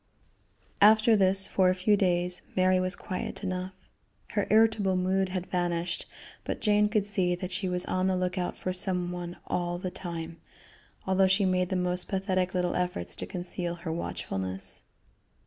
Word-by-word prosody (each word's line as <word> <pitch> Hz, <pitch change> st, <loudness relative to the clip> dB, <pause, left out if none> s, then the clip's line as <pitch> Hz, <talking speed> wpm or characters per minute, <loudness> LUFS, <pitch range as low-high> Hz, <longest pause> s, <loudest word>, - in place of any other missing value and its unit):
After 220 Hz, +2 st, +6 dB
this, 195 Hz, -1 st, +5 dB
for 185 Hz, -1 st, +3 dB
a 185 Hz, -, +2 dB
few 200 Hz, +3 st, +3 dB
days, 180 Hz, -2 st, +1 dB
Mary 185 Hz, 0 st, +3 dB
was 185 Hz, +1 st, -1 dB
quiet 185 Hz, +2 st, -5 dB
enough. 185 Hz, 0 st, -3 dB, 0.6 s
Her 205 Hz, -2 st, -1 dB
irritable 215 Hz, -3 st, +4 dB
mood 190 Hz, +1 st, +1 dB
had 185 Hz, -1 st, -3 dB
vanished, 175 Hz, -1 st, -2 dB, 0.4 s
but -, -, -4 dB
Jane 210 Hz, -1 st, +3 dB
could 210 Hz, -2 st, +1 dB
see 185 Hz, -4 st, +1 dB
that 180 Hz, +1 st, -6 dB
she 185 Hz, +1 st, -2 dB
was 180 Hz, 0 st, 0 dB
on 185 Hz, 0 st, 0 dB
the 190 Hz, -, +1 dB
lookout 180 Hz, 0 st, -2 dB
for 185 Hz, -, -3 dB
some 180 Hz, -1 st, -1 dB
one 175 Hz, 0 st, -6 dB
all 175 Hz, 0 st, -2 dB
the 180 Hz, 0 st, -4 dB
time, 170 Hz, -2 st, -6 dB, 0.7 s
although 190 Hz, 0 st, +3 dB
she 195 Hz, +1 st, +3 dB
made 180 Hz, -1 st, +1 dB
the 190 Hz, -, -1 dB
most 180 Hz, 0 st, 0 dB
pathetic 185 Hz, -1 st, -1 dB
little 180 Hz, -1 st, +1 dB
efforts 180 Hz, -, -2 dB
to -, -, -4 dB
conceal 175 Hz, -1 st, -4 dB
her 170 Hz, -1 st, -5 dB
watchfulness. 95 Hz, -, -3 dB
185 Hz, 165 wpm, -28 LUFS, 180-190 Hz, 0.7 s, After